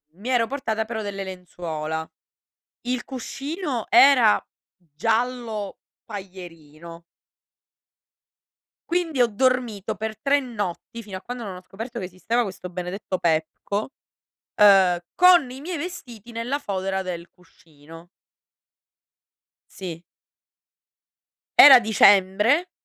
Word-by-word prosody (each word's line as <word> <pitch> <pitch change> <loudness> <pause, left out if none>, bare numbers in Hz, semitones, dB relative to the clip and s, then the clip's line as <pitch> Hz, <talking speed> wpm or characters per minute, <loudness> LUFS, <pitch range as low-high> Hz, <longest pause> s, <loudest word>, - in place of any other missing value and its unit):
mi 210 +7 -7
ero 240 -3 +2
portata 225 -5 -2
però 220 -1 -5
delle 200 -2 -5
lenzuola. 160 -4 -6 0.7
Il 250 0 -3
cuscino 275 - -5
era 270 -10 +6 0.3
giallo 220 - -3 0.3
paglierino. 170 -5 -11 1.9
Quindi 335 -5 -1
ho 240 - +5
dormito 225 -3 -1
per 220 +1 -5
3 285 +1 +3
notti 230 -3 -6
fino 200 -4 -8
a 185 - -12
quando 245 -1 -7
non 195 -3 -6
ho 180 - -10
scoperto 225 +6 -8
che 190 - -4
esisteva 205 +7 -1
questo 185 -3 -7
benedetto 185 +2 -5
Pepco, 170 +7 -1 0.7
ehm, 190 -4 +6
con 355 -7 +5
i 260 - -9
miei 340 +3 -5
vestiti 250 - -8
nella 240 +5 -3
fodera 190 -5 -3
del 175 -2 -6
cuscino. 165 -1 -17 1.6
Sì. 170 -3 -8 1.6
Era 270 -3 +11
dicembre 215 - +3
210 Hz, 105 wpm, -23 LUFS, 180-250 Hz, 1.9 s, Era